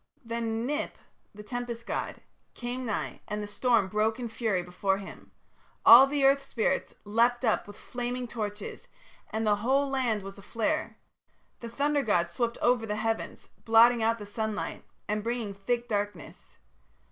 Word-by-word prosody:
"Then 230 0 -2
Ninip, 295 +2 -2 0.4
the 210 0 -11
tempest 240 0 -5
god, - - -4 0.3
came 245 +1 -4
nigh, 215 - -3
and 210 0 -3
the - - -3
storm 215 0 +2
broke 215 +3 +1
in 240 -2 -4
fury 215 -5 -1
before 190 +2 0
him. 195 -1 -11 0.5
All 245 +4 +11
the 280 0 +1
earth 275 0 +4
spirits 275 +1 -1
leapt 235 +4 +2
up 220 - +1
with 205 - -11
flaming 245 0 -4
torches 210 -3 -5 0.4
and 220 +1 -2
the 210 -1 +3
whole 265 +6 +2
land 250 -6 0
was 195 +1 -9
aflare. 230 +9 -2 0.6
The 235 - -7
thunder 285 +4 +1
god 175 -8 +1
swept 235 +7 -2
over 240 -2 +3
the 210 - -1
heavens, 225 +1 -3
blotting 230 +1 +6
out 225 +1 +2
the 210 - -8
sunlight 215 +1 -4 0.2
and 210 +1 -1
bringing 230 -3 -2
thick 235 +5 -2
darkness. 205 - -4
225 Hz, 160 wpm, -29 LUFS, 210-245 Hz, 0.6 s, All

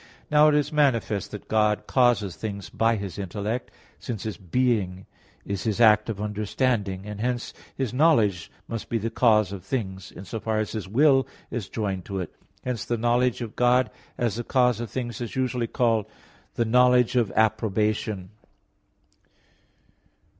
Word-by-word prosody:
Now 150 +1 +6
it 150 - +4
is 150 +1 0
manifest 115 -9 +1
that 105 - -9
God 105 -1 +2
causes 120 -8 +2
things 100 -3 -6
by 115 0 +2
His 100 -2 -5
intellect, 105 +5 -3 0.3
since 110 -5 -5
His 110 - -4
being 95 -2 0 0.4
is 100 -1 -3
His 110 -2 -1
act 105 -1 +5
of 105 -3 -3
understanding; 105 -1 -1
and 105 0 -6
hence 125 0 -2 0.2
His 130 -3 -2
knowledge 115 - +3 0.2
must 115 -2 -5
be 115 - 0
the 115 +1 -3
cause 110 -5 +3
of 100 -3 -7
things, 95 -5 -4
in 95 - -10
so 110 - -5
far 110 0 -1
as 110 0 -1
His 110 -4 -5
will 135 +4 +4 0.2
is 115 -6 -4
joined 100 -5 -3
to 100 - -5
it. 90 - -5 0.3
Hence 125 -5 -2
the 120 - -2
knowledge 120 +2 +1
of 115 -3 -6
God 125 +1 +3 0.3
as 115 -3 -1
the 120 - -3
cause 125 -2 +2
of 120 -2 -4
things 120 +1 -4
is 120 - -5
usually 125 -2 0
called 115 -3 +1 0.5
the 115 - +1
"knowledge 125 +1 +4
of 115 -5 +2
approbation." 110 -2 0
110 Hz, 165 wpm, -25 LUFS, 100-125 Hz, 0.5 s, Now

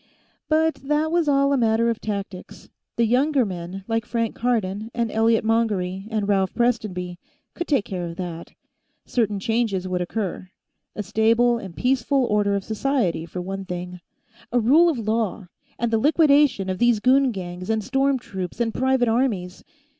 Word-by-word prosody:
But 320 +1 +2
that 300 +2 +1
was 340 -2 +1
all 275 0 +3
a - - +2
matter 230 -1 +2
of 230 -1 -1
tactics; 200 -3 -6 0.3
the 235 - +2
younger 260 +3 +2
men, 185 0 -6
like 225 -1 0
Frank 230 -2 -2
Cardon 220 -3 -1
and 235 -2 -1
Elliot 225 0 +2
Mongery 205 -4 0
and 215 -3 -1
Ralph 195 -2 +1
Prestonby, 195 -7 -1 0.3
could 345 - -4
take 275 -9 +1
care 180 -3 -4
of 170 - -7
that. 170 -2 -7 0.5
Certain 210 -4 0
changes 215 -3 -1
would 180 -1 -1
occur: 185 0 -4 0.5
A 210 - -3
stable 230 +4 +2
and 190 -6 -10
peaceful 260 +1 +1
order 205 -2 +1
of 200 - -2
society, 220 - -1
for 180 - -5
one 195 +2 -5
thing. 180 -1 -6 0.5
A 245 - +3
rule 300 +10 +5
of 310 - -1
law, 215 -4 -2 0.3
and 235 0 -1
the 225 - +2
liquidation 285 - +4
of 185 -1 -3
these 240 -2 +3
goon 260 +3 +4
gangs 180 -2 -7
and 220 -1 0
storm 270 +3 +1
troops 190 -6 -6
and 230 -2 0
private 260 -1 +2
armies. 225 -7 -1
225 Hz, 170 wpm, -23 LUFS, 190-250 Hz, 0.5 s, rule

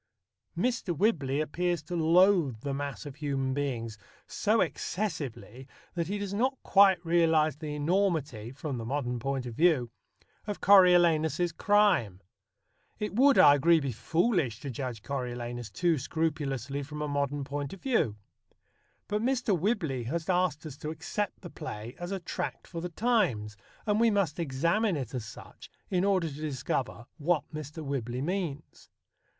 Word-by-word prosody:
Mr. 225 - -1
Whibley 145 -9 +1
appears 170 +2 -1
to 175 +4 -5
loathe 165 - +4
the 140 0 -3
mass 140 +1 -4
of 140 -1 -8
human 135 -3 -1
beings 120 -6 -3 0.3
so 215 +2 +1
excessively 140 - -3 0.3
that 170 -2 -2
he 205 +3 -2
does 200 -1 -4
not 260 +6 +1
quite 195 -2 +6
realize 160 -3 +3
the 150 -1 -5
enormity 150 - 0
(from 135 -1 -5
the - - -5
modern 125 0 -2
point 135 +1 -2
of 120 - -6
view) 145 -5 +2 0.6
of 205 - -3
Coriolanus's 175 -3 +5
crime. 185 - +2 0.8
It 210 -1 -3
would, 270 +5 +5
I 145 - +8
agree, 165 +4 +4
be 140 -3 -2
foolish 155 - 0
to 140 - -5
judge 125 -3 -5
Coriolanus 120 -3 -4
too 170 -4 +1
scrupulously 140 -3 -2
from 150 +2 -6
a - - -2
modern 145 0 -1
point 140 0 -4
of 195 - -11
view. 230 - +1 0.9
But 210 +1 -1
Mr. 250 -4 +1
Whibley 165 - -1
has 160 +6 -3
asked 180 -4 +1
us 145 -3 -8
to 150 - -5
accept 175 +6 -4
the 175 - -9
play 120 -7 -7
as 175 +2 -5
a 195 - -2
tract 175 - -5
for 170 -2 -6
the 180 - -4
times, 170 - 0 0.3
and 210 0 +2
we 230 0 +5
must 195 -7 0
examine 170 +7 +1
it 130 -3 -5
as 125 -4 -4
such 105 - -12 0.2
in 180 -1 +2
order 190 -4 +2
to 150 - -6
discover 130 -4 -3
what 160 +1 +1
Mr. 155 +1 -6
Whibley 125 -2 -3
means. 165 -4 -4
155 Hz, 155 wpm, -29 LUFS, 135-180 Hz, 0.9 s, I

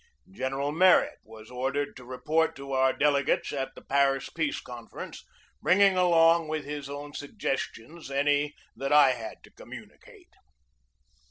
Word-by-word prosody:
General 135 -3 -2
Merritt 180 +3 +4
was 110 +1 -14
ordered 135 +3 -2
to 125 - -12
report 150 +6 0
to 140 0 -9
our 130 0 +3
delegates 140 0 +1
at 135 -1 -4
the - - -13
Paris 135 -1 +1
Peace 160 -3 -2
Confer 120 -2 -10
ence, - - -10 0.4
bringing 195 +1 +4
along 170 -2 +4
with 155 -2 -3
his 145 -1 -6
own 145 +1 -7
suggestions 145 +1 -5
any 145 +1 +1 0.2
that 135 +1 -4
I 145 -3 +7
had 115 -3 -7
to - - -17
communicate. - - -14
145 Hz, 145 wpm, -27 LUFS, 135-155 Hz, 0.4 s, I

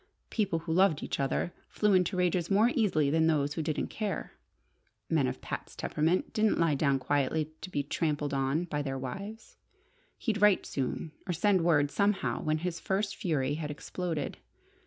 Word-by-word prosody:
People 205 -7 +1
who 165 0 -3
loved 180 -3 +3
each - - -3
other 140 +5 0 0.2
flew 210 -1 +2
into 185 0 +2
rages 180 -1 +1
more 210 +5 +4
easily 155 -11 +2
than 160 +1 +3
those 145 -2 +2
who 160 - -2
didn't 155 -1 -2
care. 210 -3 -3 0.8
Men - - +3
of 65 - -4
Pat's - - -6
temperament 165 +5 0
didn't 215 0 +2
lie 165 -3 +3
down 140 -1 +2
quietly 145 +3 0
to - - -6
be 145 -5 -1
trampled 150 -1 -1
on 135 +4 +1
by 150 -4 -2
their 135 -2 -3
wives. 200 - -7 0.6
He'd 215 -4 -1
write 210 -2 +5
soon, 140 +4 -3 0.2
or 180 - 0
send 190 +2 +3
word 145 -4 +3
somehow 205 -1 +1
when 155 0 +1
his 170 +1 -3
first 200 +1 -1
fury 145 - 0
had 150 0 -3
exploded. 155 0 -4
165 Hz, 175 wpm, -30 LUFS, 145-190 Hz, 0.8 s, write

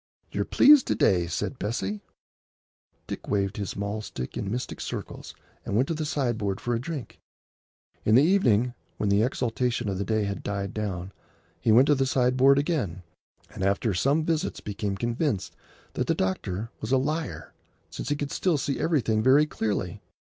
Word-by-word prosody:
"You're - - -1
pleased 290 -2 +6
to - - +1
day," 90 -3 +3
said 125 +8 -3
Bessie. 105 -1 -2 1.0
Dick - - -7
waved 100 -1 0
his 100 -2 -4
mahl 100 +2 -3
stick 65 -11 -6
in 100 - -3
mystic 125 +4 -4
circles - - -6 0.3
and 100 - -3
went 125 +5 +3
to - - +1
the 155 -1 -3
sideboard 115 -9 -1
for 120 +3 -2
a 115 - 0
drink. 145 -4 -6 0.8
In 110 - +4
the 130 - +7
evening, 125 - +3 0.2
when 105 - 0
the 100 +1 +4
exaltation 120 -1 0
of 95 -1 -2
the - - 0
day 110 +1 0
had 100 -1 -3
died 100 -1 -3
down, 95 -3 -4 0.5
he 110 - +2
went 120 +5 +7
to 145 - +4
the 135 -1 +1
sideboard 130 +2 +4
again, 140 - -1 0.5
and - - -8
after 100 +3 +1
some 140 - +2
visits 160 -2 -1
became 100 -1 -3
convinced 120 - -1 0.4
that - - -2
the - - +3
eye 95 0 +1
doctor 100 +5 -5
was 110 - -5
a 135 - +5
liar, 155 +5 -3 0.4
since - - -5
he 145 - +1
could 145 -1 -4
still 180 -5 +1
see 140 -1 -2
everything 115 -10 +1
very 135 +6 +5
clearly. 105 - -3
115 Hz, 180 wpm, -26 LUFS, 100-140 Hz, 1.0 s, the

